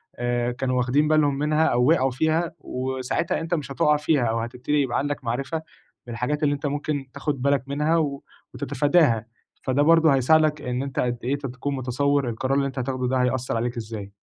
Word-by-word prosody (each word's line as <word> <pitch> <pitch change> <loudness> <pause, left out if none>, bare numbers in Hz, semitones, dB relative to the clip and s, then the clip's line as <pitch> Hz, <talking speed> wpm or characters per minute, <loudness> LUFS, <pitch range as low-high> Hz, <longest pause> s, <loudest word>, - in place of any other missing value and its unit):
آآ، 120 0 -1
كانوا 130 +1 -1
واخدين 130 +4 +2
بالهم 150 -3 +3
منها، 150 +2 +2
أو 125 +1 +2
وقعوا 135 -5 +3
فيها، 160 +5 0
وساعتها 130 +4 -2
أنت 165 +1 -4
مش 140 -5 -2
هتُقع 150 +3 +3
فيها، 150 -3 +1
أو 115 0 0
هتبتدي 125 +5 -1
يبقى 125 -3 -1
عندك 145 -1 -2
معرفة 135 +7 -2 0.5
بالحاجات 125 +6 -2
اللي 145 -1 +3
أنت 145 - -7
ممكن 145 0 -2
تاخد 145 -1 -3
بالك 140 -1 +2
منها، 150 +4 +1
و 140 -3 -1 0.3
وتتفاداها، 145 -3 +2 0.4
فده 130 +2 +1
برضه 165 0 +5
هيساعدك 150 +3 +3
إن 125 +2 -2
أنت 135 -1 -4
قد 120 -1 0
إيه 135 +3 0
ت 140 - -8
تكون 130 +3 -4
متصوّر 135 +1 0
القرار 130 +4 -1
اللي 140 - +1
أنت 135 0 -5
هتاخده 130 0 -2
ده 130 - +1
هيأثّر 125 -1 -1
عليك 120 +1 -2
إزاي. 105 -3 -6
135 Hz, 190 wpm, -24 LUFS, 125-150 Hz, 0.5 s, برضه